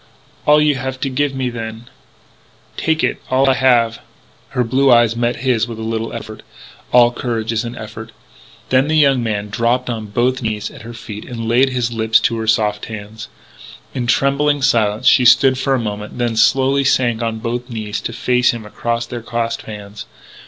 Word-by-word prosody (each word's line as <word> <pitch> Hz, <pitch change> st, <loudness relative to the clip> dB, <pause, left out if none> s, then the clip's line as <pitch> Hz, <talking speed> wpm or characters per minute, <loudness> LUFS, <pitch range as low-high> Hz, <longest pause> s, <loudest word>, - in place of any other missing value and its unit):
"All 150 Hz, 0 st, +6 dB
you 150 Hz, -1 st, +3 dB
have 130 Hz, 0 st, -5 dB
to 135 Hz, -, -1 dB
give 140 Hz, +1 st, -1 dB
me, 130 Hz, -2 st, -2 dB
then." 115 Hz, 0 st, -7 dB, 0.9 s
"Take 160 Hz, 0 st, 0 dB
it... -, -, -1 dB
all 130 Hz, +1 st, +3 dB
I 135 Hz, -, +5 dB
have...." 120 Hz, -3 st, +2 dB, 0.5 s
Her 125 Hz, -, 0 dB
blue 130 Hz, +3 st, +2 dB
eyes 120 Hz, -1 st, +4 dB
met 120 Hz, 0 st, 0 dB
his 120 Hz, -2 st, +2 dB
with 115 Hz, -2 st, -7 dB
a 110 Hz, -, -6 dB
little 115 Hz, 0 st, -3 dB
effort. 110 Hz, 0 st, -8 dB, 0.5 s
All 120 Hz, -1 st, +6 dB
courage 115 Hz, -2 st, -3 dB
is 115 Hz, 0 st, -1 dB
an 120 Hz, +1 st, -6 dB
effort. 110 Hz, +1 st, -9 dB, 0.6 s
Then 130 Hz, +2 st, +3 dB
that 155 Hz, -, 0 dB
young 140 Hz, -4 st, +4 dB
man 105 Hz, -2 st, -3 dB
dropped 120 Hz, +4 st, 0 dB
on 110 Hz, -2 st, -5 dB
both 125 Hz, +5 st, 0 dB
knees 110 Hz, -2 st, -3 dB
at -, -, -12 dB
her 115 Hz, +2 st, -9 dB
feet 105 Hz, -2 st, -8 dB
and 115 Hz, -2 st, -6 dB
laid 125 Hz, +4 st, +3 dB
his 120 Hz, -2 st, -2 dB
lips 110 Hz, -1 st, +3 dB
to 115 Hz, -, 0 dB
her 110 Hz, -, -4 dB
soft 105 Hz, -1 st, +1 dB
hands. 110 Hz, 0 st, -8 dB, 0.6 s
In 125 Hz, -2 st, -3 dB
trembling 140 Hz, +3 st, +1 dB
silence 110 Hz, -4 st, +1 dB
she 130 Hz, -, +6 dB
stood 130 Hz, +2 st, +5 dB
for 135 Hz, 0 st, +1 dB
a -, -, -1 dB
moment, 105 Hz, -1 st, -5 dB
then 120 Hz, -2 st, -1 dB
slowly 135 Hz, +4 st, +3 dB
sank 120 Hz, -3 st, +1 dB
on 115 Hz, -1 st, -2 dB
both 120 Hz, +2 st, -4 dB
knees 110 Hz, -3 st, -4 dB
to -, -, -4 dB
face 125 Hz, +1 st, +1 dB
him 110 Hz, -2 st, -8 dB
across 115 Hz, +2 st, -3 dB
their 120 Hz, 0 st, -6 dB
clasped 115 Hz, 0 st, -3 dB
hands. 105 Hz, -1 st, -9 dB
120 Hz, 195 wpm, -18 LUFS, 110-130 Hz, 0.9 s, All